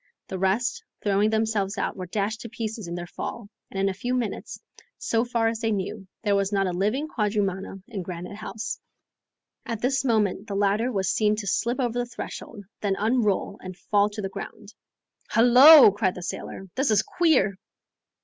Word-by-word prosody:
The 190 - -4
rest, 210 +6 0 0.2
throwing 205 +1 +2
themselves 220 -3 0
out, - - -1
were 185 -2 -6
dashed 210 +4 -2
to 230 - -7
pieces 220 -3 -5
in 170 - -4
their 175 0 -5
fall, 205 +4 -6 0.2
and 195 - -5
in 195 - +2
a 195 - 0
few 245 +7 -2
minutes, 240 -4 -3 0.4
so 230 0 0
far 235 -2 0
as 225 -1 -1
they 225 -1 0
knew, 195 0 -3 0.2
there 205 -2 +2
was 200 0 0
not 195 -1 +2
a 185 - -1
living 215 - 0
quadrumana 200 -5 -2
in 215 -6 -5
Granite 180 +2 -7
House. 220 0 -5 0.8
At 230 -3 -4
this 260 +3 +1
moment 215 -4 +1
the 200 - -4
ladder 205 +5 +1
was 195 -4 -1
seen 215 -1 +2
to 210 -1 -5
slip 235 +6 0
over 245 -2 0
the 245 - -2
threshold, 225 -3 -8 0.2
then 200 -2 0
unroll 210 -3 0
and 185 -1 -8
fall 205 0 +2
to 210 0 -6
the 195 - -2
ground. 205 +2 -9 0.6
"Hullo!" 250 +3 +9
cried 195 -2 0
the 180 - -7
sailor, 190 +2 -6
"this 270 +1 0
is 215 -1 +4
queer!" 255 - +2
210 Hz, 190 wpm, -25 LUFS, 195-230 Hz, 0.8 s, Hullo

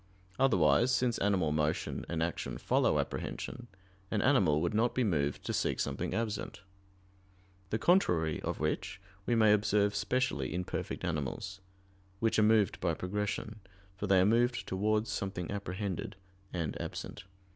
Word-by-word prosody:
Otherwise, 85 - +4
since 125 -2 +1
animal 95 -6 +2
motion 75 0 -1
and 80 -1 0
action 85 - -3
follow - - +2
apprehension, 120 - -4 0.4
an 110 - 0
animal 95 - +4
would 85 +4 0
not 115 +3 +1
be 130 - +2
moved 75 -9 0
to - - -3
seek - - 0
something - - -2
absent: 110 -2 -3 1.1
the 110 - 0
contrary 90 - +2
of - - -3
which - - -2 0.3
we 120 - +2
may 110 -2 +6
observe 105 0 +2
specially 100 - -1
in 90 - -1
perfect 90 - -4
animals, 90 +5 -3 0.6
which 115 0 +2
are - - +5
moved 105 -1 +3
by 85 -3 0
progression, 105 +3 -3 0.4
for 100 +2 -4
they 95 -1 +5
are 90 - +5
moved 120 +3 +2
towards 105 +3 0
something 95 -3 -3
apprehended 100 +1 -4 0.4
and 85 -5 -3
absent. - - -6
100 Hz, 145 wpm, -32 LUFS, 85-110 Hz, 1.1 s, may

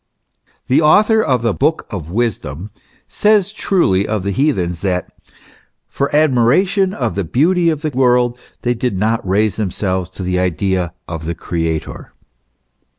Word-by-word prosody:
The 130 - +3
author 210 +8 +4
of 130 - 0
the 115 -3 +1
Book 155 +8 0
of 85 -7 -6
Wisdom 100 - -3 0.4
says 210 -1 +2
truly 100 - +1
of 105 -3 -2
the 100 - -1
heathens, 95 - 0
that, 90 -3 -2 0.4
" - - -28 0.3
for 140 - -2
admiration 155 - +3
of 120 - -2
the 100 - -2
beauty 170 - +2
of 155 -1 -2
the 155 - -1
world 125 -1 +2 0.2
they 120 - +1
did 120 -4 -2
not 110 +4 0
raise 105 +2 +1
themselves 95 -3 -2
to 95 - -5
the 90 0 -1
idea 90 0 -1
of 80 -1 -6
the 85 - -2
Creator." 80 -2 -4
115 Hz, 155 wpm, -17 LUFS, 90-150 Hz, 0.4 s, author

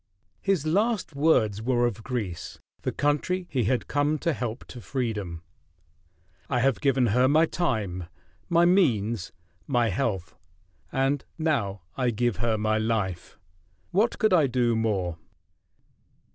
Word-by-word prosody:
His 190 -6 +1
last 200 0 0
words 110 -9 +2
were 120 +1 +2
of 115 -3 -2
Greece, 105 -10 -4 0.2
the - - -1
country 150 +6 0
he 125 -5 +1
had 125 +4 0
come 145 +2 +1
to 165 +2 0
help 120 -3 -4
to 125 - -9
freedom: 105 - -3 1.1
"I 125 - +1
have 135 0 +2
given 135 -3 +3
her 125 +2 +4
my 155 +4 +5
time, 110 - -2 0.4
my 170 0 +5
means, 120 - +2 0.4
my 120 -4 +2
health 95 -4 -2 0.6
and 135 +1 +1
now 120 - -1
I 130 -2 +1
give 120 -1 0
her 110 +1 0
my 110 +1 +1
life! 105 -6 -2 0.5
What 210 +6 +2
could 215 -4 +3
I 160 -6 +5
do 120 -2 +1
more?" 95 -7 -1
125 Hz, 135 wpm, -26 LUFS, 110-150 Hz, 1.1 s, my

